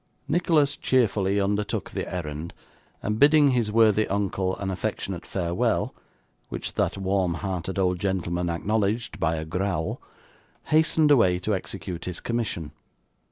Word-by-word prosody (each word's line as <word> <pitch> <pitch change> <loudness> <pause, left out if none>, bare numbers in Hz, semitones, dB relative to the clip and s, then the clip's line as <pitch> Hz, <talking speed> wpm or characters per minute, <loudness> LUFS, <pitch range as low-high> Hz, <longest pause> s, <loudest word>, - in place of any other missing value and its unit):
Nicholas 150 -3 +2
cheerfully 100 -6 +2
undertook 100 +1 -1
the - - -4
errand, 80 -2 -5 0.5
and 105 +1 -1
bidding 145 0 +6
his 120 -4 +1
worthy 110 -1 +4
uncle 95 -2 -1
an 95 -1 -3
affectionate 90 -2 -4
farewell, 85 -1 0 0.6
which - - -5
that - - 0
warm 95 -2 0
hearted 95 0 -4
old 90 -2 +1
gentleman 90 -2 -1
acknowledged 105 +5 -1
by 80 - +1
a 80 0 -4
growl, 90 0 -2 0.7
hastened 155 -1 +4
away 95 -10 +5
to 100 +4 -1
execute 95 -2 -5
his 90 -2 -4
commission. 105 -10 -3
95 Hz, 130 wpm, -26 LUFS, 90-110 Hz, 0.7 s, bidding